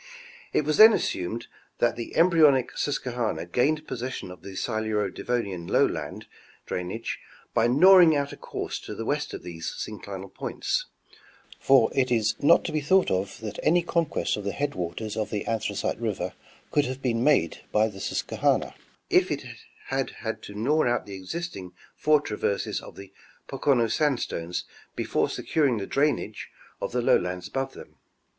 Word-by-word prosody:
It 150 Hz, -, +1 dB
was 155 Hz, 0 st, +1 dB
then 220 Hz, +1 st, +10 dB
assumed 115 Hz, -, -2 dB, 0.3 s
that 120 Hz, -1 st, +2 dB
the 115 Hz, -, -6 dB
embryonic 155 Hz, -6 st, +4 dB
Susquehanna 125 Hz, -5 st, -2 dB
gained 150 Hz, +5 st, +1 dB
possession 125 Hz, -6 st, -5 dB
of 90 Hz, -, -12 dB
the 95 Hz, -1 st, -9 dB
Siluro 110 Hz, -2 st, -1 dB
Devonian 100 Hz, -8 st, -3 dB
lowland -, -, 0 dB, 0.4 s
drainage 90 Hz, +6 st, -4 dB, 0.3 s
by 115 Hz, -1 st, +3 dB
gnawing 170 Hz, +5 st, +7 dB
out 140 Hz, 0 st, -1 dB
a -, -, -7 dB
course -, -, -5 dB
to -, -, -8 dB
the 115 Hz, -, -5 dB
west 145 Hz, +3 st, -1 dB
of -, -, -9 dB
these 85 Hz, -2 st, -6 dB
synclinal 100 Hz, -2 st, -7 dB
points; -, -, -2 dB, 0.7 s
for 135 Hz, -4 st, +5 dB
it 130 Hz, -2 st, +1 dB
is 110 Hz, -2 st, +2 dB
not 165 Hz, +4 st, +5 dB
to -, -, -2 dB
be 155 Hz, -, 0 dB
thought 185 Hz, +6 st, +3 dB
of 95 Hz, +1 st, -1 dB
that 105 Hz, -2 st, -6 dB
any 175 Hz, +1 st, +3 dB
conquest 170 Hz, -8 st, 0 dB
of 105 Hz, -, -5 dB
the 100 Hz, -, -2 dB
headwaters 105 Hz, -6 st, -3 dB
of 110 Hz, -1 st, -2 dB
the 105 Hz, -, -3 dB
Anthracite 115 Hz, -1 st, -2 dB
river -, -, -2 dB, 0.4 s
could 145 Hz, -1 st, +3 dB
have 130 Hz, +1 st, -5 dB
been 120 Hz, -2 st, +1 dB
made 135 Hz, -, +3 dB
by 110 Hz, +1 st, +3 dB
the 100 Hz, -3 st, -9 dB
Susquehanna -, -, 0 dB, 0.4 s
if -, -, +4 dB
it -, -, -2 dB, 0.5 s
had -, -, 0 dB, 0.2 s
had -, -, -3 dB
to 100 Hz, -, -10 dB
gnaw 145 Hz, +9 st, +2 dB
out 120 Hz, 0 st, 0 dB
the 100 Hz, -, -9 dB
existing 95 Hz, -, -6 dB, 0.2 s
four 150 Hz, 0 st, +4 dB
traverses 105 Hz, -6 st, -2 dB
of -, -, -12 dB
the 100 Hz, -1 st, -12 dB, 0.3 s
Pocono 130 Hz, -5 st, +2 dB
sandstones 115 Hz, -, -1 dB, 0.3 s
before -, -, 0 dB
securing 140 Hz, -7 st, +1 dB
the 100 Hz, -, -3 dB
drainage 145 Hz, +6 st, -1 dB, 0.3 s
of -, -, -2 dB
the 125 Hz, 0 st, 0 dB
lowlands 90 Hz, -4 st, +1 dB
above 135 Hz, 0 st, -3 dB
them. -, -, -13 dB
120 Hz, 165 wpm, -26 LUFS, 100-145 Hz, 0.7 s, then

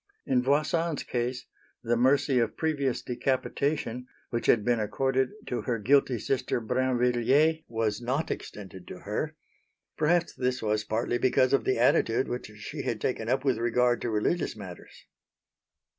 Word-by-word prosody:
In 125 Hz, -2 st, +2 dB
Voisin's 150 Hz, +4 st, +1 dB
case 125 Hz, +1 st, -3 dB, 0.4 s
the 120 Hz, 0 st, +1 dB
mercy 130 Hz, +2 st, +3 dB
of 115 Hz, -2 st, -1 dB
previous 140 Hz, -5 st, -1 dB
decapitation, 130 Hz, 0 st, -1 dB, 0.2 s
which 120 Hz, -1 st, -2 dB
had 110 Hz, -3 st, +4 dB
been 120 Hz, -1 st, +2 dB
accorded 130 Hz, +5 st, 0 dB, 0.2 s
to 125 Hz, -, -3 dB
her 120 Hz, -3 st, -1 dB
guilty 130 Hz, +3 st, +3 dB
sister 125 Hz, +2 st, -1 dB
Brinvilliers, 125 Hz, +5 st, +2 dB
was 110 Hz, -1 st, -1 dB
not 135 Hz, +6 st, -1 dB
extended 95 Hz, -3 st, -7 dB
to -, -, -9 dB
her. -, -, -3 dB, 0.6 s
Perhaps 170 Hz, +2 st, +2 dB
this 125 Hz, 0 st, -1 dB
was 105 Hz, -1 st, 0 dB
partly 115 Hz, +3 st, -1 dB
because 130 Hz, 0 st, +3 dB
of 140 Hz, -, +2 dB
the 130 Hz, -, +1 dB
attitude 115 Hz, 0 st, +3 dB
which 125 Hz, -, -4 dB
she 125 Hz, +8 st, -6 dB
had 115 Hz, -5 st, -2 dB
taken 115 Hz, -1 st, -2 dB
up 130 Hz, +2 st, 0 dB
with 130 Hz, -4 st, +2 dB
regard 120 Hz, +1 st, +2 dB
to 120 Hz, -, -2 dB
religious 110 Hz, +10 st, 0 dB
matters. 95 Hz, -4 st, -11 dB
125 Hz, 150 wpm, -28 LUFS, 115-135 Hz, 0.6 s, had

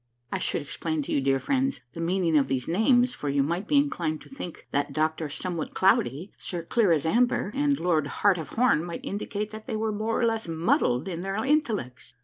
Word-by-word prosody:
I -, -, -1 dB
should -, -, -1 dB
explain 155 Hz, +1 st, -3 dB
to -, -, -6 dB
you, 140 Hz, -, +2 dB
dear 135 Hz, 0 st, +2 dB
friends, 270 Hz, -, 0 dB
the 165 Hz, -, -6 dB
meaning 170 Hz, -1 st, +1 dB
of 145 Hz, -2 st, +4 dB
these 130 Hz, -2 st, -2 dB
names, 245 Hz, +7 st, +3 dB
for 145 Hz, -, -4 dB
you 140 Hz, 0 st, +2 dB
might 170 Hz, +7 st, -2 dB
be -, -, +1 dB
inclined 175 Hz, -, +1 dB
to -, -, -14 dB
think 180 Hz, -, -8 dB
that 145 Hz, 0 st, -1 dB
Doctor 155 Hz, +1 st, 0 dB
Somewhat 170 Hz, +3 st, -4 dB
Cloudy, 175 Hz, -, +2 dB
Sir 175 Hz, -2 st, -4 dB
Clear 205 Hz, +2 st, +2 dB
as 155 Hz, -3 st, +2 dB
Amber; 235 Hz, +2 st, +2 dB
and 285 Hz, 0 st, +1 dB
Lord 160 Hz, -5 st, +1 dB
Heart 195 Hz, 0 st, +2 dB
of 155 Hz, -4 st, -6 dB
Horn 235 Hz, -9 st, +2 dB
might 170 Hz, -1 st, -6 dB
indicate 205 Hz, +1 st, -3 dB
that 215 Hz, +2 st, -9 dB
they 230 Hz, -, -2 dB
were 220 Hz, 0 st, -1 dB
more 215 Hz, +2 st, -1 dB
or 235 Hz, -, +3 dB
less 225 Hz, -3 st, 0 dB
muddled 160 Hz, -5 st, +1 dB
in 175 Hz, -2 st, -4 dB
their 195 Hz, +1 st, -3 dB
intellects. 210 Hz, -, -1 dB
175 Hz, 215 wpm, -27 LUFS, 155-220 Hz, -, of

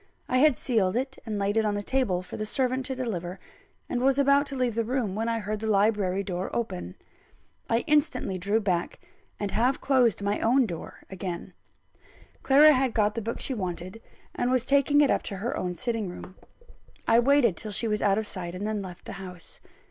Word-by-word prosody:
I 255 Hz, -, +2 dB
had 300 Hz, -2 st, +5 dB
sealed 215 Hz, -5 st, +1 dB, 0.3 s
and 215 Hz, -2 st, -2 dB
laid 200 Hz, +2 st, 0 dB
it 220 Hz, -, +4 dB
on 210 Hz, -1 st, 0 dB
the 205 Hz, -, -3 dB
table 205 Hz, -8 st, 0 dB
for 180 Hz, -, -9 dB
the 215 Hz, -, -3 dB
servant 260 Hz, +1 st, 0 dB
to 265 Hz, -, -3 dB
deliver, 190 Hz, -8 st, -4 dB, 0.5 s
and 245 Hz, -, -2 dB
was 270 Hz, +1 st, +3 dB
about 280 Hz, +1 st, +4 dB
to 275 Hz, -, -6 dB
leave 250 Hz, -3 st, 0 dB
the 230 Hz, +1 st, 0 dB
room, 235 Hz, -4 st, -1 dB
when 225 Hz, +3 st, -1 dB
I 230 Hz, -, 0 dB
heard 215 Hz, 0 st, -3 dB
the 220 Hz, -, -4 dB
library 200 Hz, -2 st, +2 dB
door 185 Hz, -1 st, -3 dB
open. 90 Hz, -, -3 dB, 0.7 s
I 230 Hz, +1 st, +2 dB
instantly 290 Hz, -, +1 dB
drew 200 Hz, +4 st, +1 dB
back, 180 Hz, -5 st, -1 dB, 0.4 s
and 205 Hz, -1 st, -2 dB
half 240 Hz, +7 st, +1 dB
closed 250 Hz, -7 st, +2 dB
my 200 Hz, +1 st, 0 dB
own 250 Hz, +3 st, +3 dB
door 170 Hz, -6 st, -8 dB
again. 185 Hz, -2 st, -5 dB, 0.9 s
Clara 290 Hz, +3 st, +7 dB
had 260 Hz, -3 st, +1 dB
got 210 Hz, -2 st, +2 dB
the 230 Hz, -, -3 dB
book 230 Hz, +2 st, -4 dB
she 270 Hz, -, -2 dB
wanted, 185 Hz, 0 st, -5 dB, 0.3 s
and 245 Hz, -, -1 dB
was 255 Hz, -1 st, +1 dB
taking 280 Hz, +2 st, +4 dB
it 285 Hz, -, +4 dB
up -, -, +2 dB
to 200 Hz, -, -6 dB
her 225 Hz, +6 st, -3 dB
own 180 Hz, -1 st, -3 dB
sitting 225 Hz, -3 st, -2 dB
room. 180 Hz, +1 st, -9 dB, 0.7 s
I 230 Hz, +1 st, +5 dB
waited 245 Hz, -5 st, +4 dB
till 215 Hz, -, -6 dB
she 225 Hz, +4 st, -2 dB
was 210 Hz, -1 st, -1 dB
out 200 Hz, -1 st, +3 dB
of 220 Hz, -, -1 dB
sight, 180 Hz, -3 st, -5 dB
and 195 Hz, +3 st, -4 dB
then 215 Hz, -1 st, -2 dB
left 180 Hz, -3 st, -9 dB
the -, -, -7 dB
house. 180 Hz, -3 st, -10 dB
220 Hz, 210 wpm, -27 LUFS, 195-255 Hz, 0.9 s, Clara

